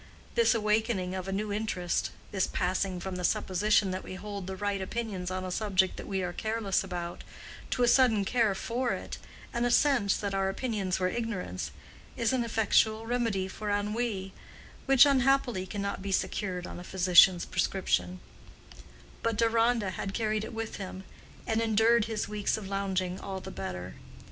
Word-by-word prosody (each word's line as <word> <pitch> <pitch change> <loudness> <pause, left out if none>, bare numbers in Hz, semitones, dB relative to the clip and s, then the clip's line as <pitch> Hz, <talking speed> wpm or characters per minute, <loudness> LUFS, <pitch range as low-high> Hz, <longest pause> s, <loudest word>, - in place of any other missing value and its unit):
This 465 - +4
awakening 215 -3 +1
of 190 0 -4
a - - -2
new 205 +1 -2
interest—this 190 -1 -2
passing 185 0 -1
from 185 0 -5
the 180 - -4
supposition 195 +2 +2
that 185 0 -4
we 185 - -7
hold 200 -1 -6
the 190 - -4
right 200 0 -2
opinions 195 -3 -3
on 185 0 -3
a 185 - -4
subject 190 -2 +1
we 190 -2 -2
are 175 -1 -3
careless 215 -1 0
about, 175 -2 -5 0.5
to 250 - +1
a - - +4
sudden 235 -5 +4
care 225 -2 +2
for 240 +5 -1
it, - - -6 0.3
and 235 - 0
a 245 - +2
sense 245 -6 +3
that 200 -1 -3
our 195 0 +1
opinions 195 -3 -2
were 185 - +2
ignorance—is 225 - -4
an 255 -2 +1
effectual 220 -1 +2
remedy 230 -5 0
for 210 +2 -5
ennui, 205 -1 -1 0.5
which, 270 0 +8
unhappily, 265 -7 +2
cannot 200 0 -3
be 195 0 -4
secured 185 -1 -1
on - - -7
a - - -8
physician's 180 -1 +5
prescription; 90 - 0 1.0
but 230 -2 0
Deronda 230 -2 +2
had 195 +1 -4
carried 215 -2 0
it - - -6
with 225 -1 -5
him, 190 -1 -7 0.4
and 225 0 0
endured 225 0 +4
his 220 -2 -2
weeks 210 0 -1
of 210 -3 -7
lounging 190 -2 -1
all 195 -1 -5
the - - -8
better. 90 -1 -6
200 Hz, 165 wpm, -29 LUFS, 185-225 Hz, 1.0 s, which